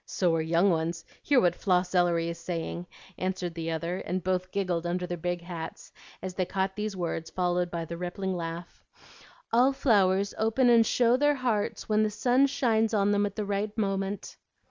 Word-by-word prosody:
"So 175 -3 +1
are 165 - +1
young 170 +4 +3
ones; 165 0 -2 0.2
hear 285 -3 +4
what 175 -5 +3
Floss 180 -1 0
Ellery 175 -2 +2
is 170 0 -6
saying," 170 +1 -4 0.3
answered 185 -2 -2
the 165 -1 -4
other; 170 +3 -2
and 185 0 -3
both 185 0 -1
giggled 180 -4 -1
under 180 +1 -1
their 175 0 -3
big 175 +1 -3
hats 170 -2 -7 0.3
as 185 -1 -4
they 185 - 0
caught 190 +1 -2
these 210 -2 -3
words 165 -2 -3
followed 180 -1 0
by 170 -1 -4
the 170 +1 -6
rippling 185 +1 -3
laugh, 170 0 -6 0.7
"All 250 +4 +5
flowers 200 -6 +2
open 225 +3 +3
and 230 -2 +5
show 245 0 +3
their 290 +1 +3
hearts 240 -6 -1
when 215 0 +2
the 215 - +2
sun 250 +6 +3
shines 225 -5 +1
on 200 0 +3
them 205 0 +2
at 200 - -9
the 210 - -2
right 205 +2 -2
moment." 195 -1 -2
185 Hz, 190 wpm, -28 LUFS, 175-210 Hz, 0.7 s, All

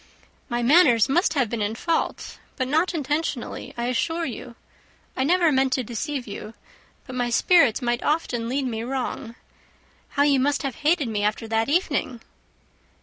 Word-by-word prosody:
"My 240 -1 -1
manners 255 -5 +5
must 315 +3 +2
have 265 -4 +2
been 225 0 -3
in 205 +2 -1
fault, 330 +7 -2 0.2
but 255 -2 -2
not 320 +6 +1
intentionally, 295 -3 -3
I 235 - -2
assure 325 +7 -1
you. 240 -2 -7 0.6
I 260 - 0
never 340 +2 +3
meant 265 -1 +2
to 255 - 0
deceive 250 +3 -4
you, 215 +1 -8 0.5
but 260 - -9
my 245 -1 0
spirits 275 -1 +4
might 240 0 0
often 245 -7 -1
lead 270 +2 -1
me 225 -3 -3
wrong. 245 -1 -4 0.8
How 285 - +5
you 285 -2 +3
must 285 +3 +1
have 270 -3 -3
hated 300 -2 +2
me 215 -2 -2
after 215 +2 -1
that 225 +2 +1
evening!" 290 -7 0
260 Hz, 165 wpm, -24 LUFS, 235-295 Hz, 0.8 s, manners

